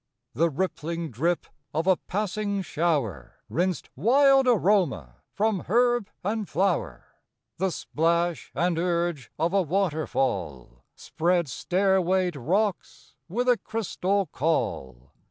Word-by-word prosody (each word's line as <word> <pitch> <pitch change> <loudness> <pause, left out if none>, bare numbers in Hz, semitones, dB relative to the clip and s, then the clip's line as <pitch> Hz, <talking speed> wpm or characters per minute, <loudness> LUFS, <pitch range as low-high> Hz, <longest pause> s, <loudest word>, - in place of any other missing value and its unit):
The 165 +3 +2
rippling 165 0 -3
drip 165 +9 0 0.3
of 160 +2 0
a 190 -1 +5
passing 200 +1 -2
shower 140 - -1
Rinsed 180 -2 -1
wild 270 - +4
aroma 180 - +2
from 210 -2 0
herb 240 0 +2
and 210 +1 -2
flower. 180 +1 -1 0.5
The 190 +2 +1
splash 170 -1 -1
and 175 -1 +1
urge 170 -6 -1
of 165 +3 0
a 200 - +4
waterfall 135 - -2
Spread 170 +4 0
stairwayed 185 +4 +1
rocks 185 - -2 0.2
with 245 +8 -1
a 245 -1 +5
crystal 200 -2 -1
caul. 65 - -2
175 Hz, 110 wpm, -26 LUFS, 155-200 Hz, 0.5 s, a